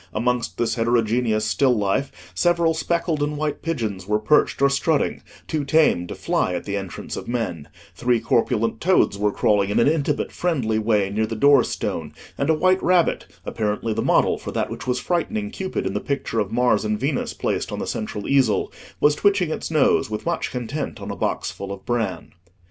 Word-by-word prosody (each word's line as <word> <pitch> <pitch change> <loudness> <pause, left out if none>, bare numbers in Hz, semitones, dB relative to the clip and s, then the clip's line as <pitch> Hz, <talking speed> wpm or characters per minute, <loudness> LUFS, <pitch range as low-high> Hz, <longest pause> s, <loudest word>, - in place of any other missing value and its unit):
Amongst 125 +2 -1
this 120 - 0
heterogeneous 115 -1 +1
still 125 +2 +2
life, 105 +7 -2
several 170 -2 +2
speckled 160 -1 -1
and 145 0 -1
white 150 -1 -2
pigeons 110 - -3
were 105 0 +2
perched 110 +8 +2
or 140 - +5
strutting, 140 +2 0 0.3
too 155 -2 -1
tame 140 - +3
to - - -6
fly 90 - 0
at - - -4
the 100 - -4
entrance 95 -3 -5
of - - -7
men; 100 -11 -3 0.3
three 120 -1 +1
corpulent 115 0 0
toads 180 - +3
were 105 0 +2
crawling 100 -1 +2
in 105 +3 +1
an 115 - +4
intimate 150 -1 0
friendly 125 -11 0
way 105 -3 +1
near 110 +2 0
the 115 - -4
door 140 +2 +5
stone; - - -4 0.2
and 140 - -1
a 160 - +4
white 185 +4 +3
rabbit, 180 -1 +2 0.2
apparently 110 +1 -2
the - - -1
model - - +2
for - - -6
that - - -2
which - - -7
was 125 - +1
frightening 205 +5 -2
Cupid 190 -2 -3
in - - -2
the - - -1
picture 140 -5 -2
of 105 -1 -1
Mars 125 0 +2
and 105 -1 -1
Venus 135 +1 -2
placed - - -2
on - - -4
the - - -3
central 105 -1 -4
easel, 135 -6 +2 0.3
was 150 - +4
twitching 195 0 +2
its - - -4
nose 150 -5 +3
with 105 0 -5
much 170 -1 -1
content 125 +1 -4
on 100 0 -6
a - - -5
box - - -2
full 100 0 -7
of 100 -1 -8
bran. 120 -2 -2
125 Hz, 200 wpm, -22 LUFS, 110-150 Hz, 0.3 s, or